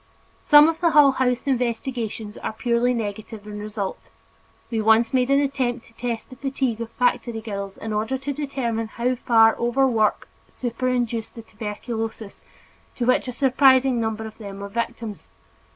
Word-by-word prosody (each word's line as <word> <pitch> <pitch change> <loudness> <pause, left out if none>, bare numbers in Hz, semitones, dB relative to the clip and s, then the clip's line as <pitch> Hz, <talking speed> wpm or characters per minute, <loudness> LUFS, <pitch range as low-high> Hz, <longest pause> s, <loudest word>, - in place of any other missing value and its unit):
Some 295 0 +7
of 325 0 -2
the 340 - +4
Hull 295 -3 +6
House 255 -2 0
investigations 235 -4 -2
are - - -5
purely 240 +2 +1
negative 215 -2 -5
in 210 0 -7
result; 210 -2 -4 0.7
we 225 -1 0
once 220 +2 +4
made 255 0 +2
an 275 0 +4
attempt 260 -4 -1
to 230 - -21
test 235 0 -4
the - - -9
fatigue 265 -3 -2
of 230 - -4
factory 245 -2 0
girls 200 -3 -6
in 220 0 -5
order 220 +5 -1
to 275 +2 -4
determine 255 -6 -2
how 240 +3 -1
far 225 -2 +4
overwork 240 -3 +1 0.2
superinduced 245 -2 -2
the 230 - -9
tuberculosis 220 0 -6 0.5
to 245 - -1
which 255 +1 +3
such 250 -2 -5
a - - -16
surprising 260 -2 +4
number 220 0 -2
of 220 +1 -10
them 200 -2 -8
were 200 - -6
victims. 225 -1 -5
235 Hz, 165 wpm, -23 LUFS, 220-255 Hz, 0.7 s, Some